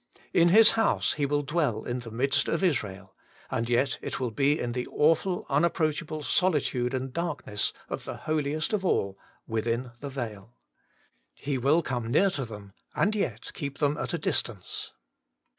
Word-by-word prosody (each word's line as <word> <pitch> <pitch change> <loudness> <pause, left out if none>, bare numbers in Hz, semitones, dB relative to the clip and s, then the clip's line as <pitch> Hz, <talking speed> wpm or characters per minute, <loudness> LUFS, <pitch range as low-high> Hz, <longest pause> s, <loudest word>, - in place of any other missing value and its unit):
In 170 0 +5
His 220 +5 +8
house 225 0 +2
He 145 -2 0
will 145 +1 +1
dwell 145 -7 0
in 125 +1 -3
the 120 -1 -8
midst 135 +5 +1
of - - 0
Israel, 100 - -1 0.4
and 115 +1 -1
yet 125 +1 +2
it - - -4
will 125 -3 -1
be 140 +6 +2
in 120 - -2
the 125 +1 -3
awful 165 +4 +2
un 145 +3 +2
approachable 155 -2 0
solitude 140 -8 +1
and 130 0 -3
darkness 145 -11 -1 0.2
of - - -5
the - - -5
holiest 155 +3 -1
of 205 -3 +1
all 100 - 0 0.3
within 115 +2 -1
the 140 - -5
veil. 115 -4 -6 0.8
He 135 -2 -2
will 150 +7 +3
come 120 -5 -2
near 185 +11 +4
to 140 -6 -3
them, 105 -3 -10 0.2
and 205 - +2
yet 120 - -2
keep 140 -1 -5
them 145 -1 +2
at - - -2
a 170 - 0
distance. 115 - -2
140 Hz, 175 wpm, -28 LUFS, 120-155 Hz, 0.8 s, His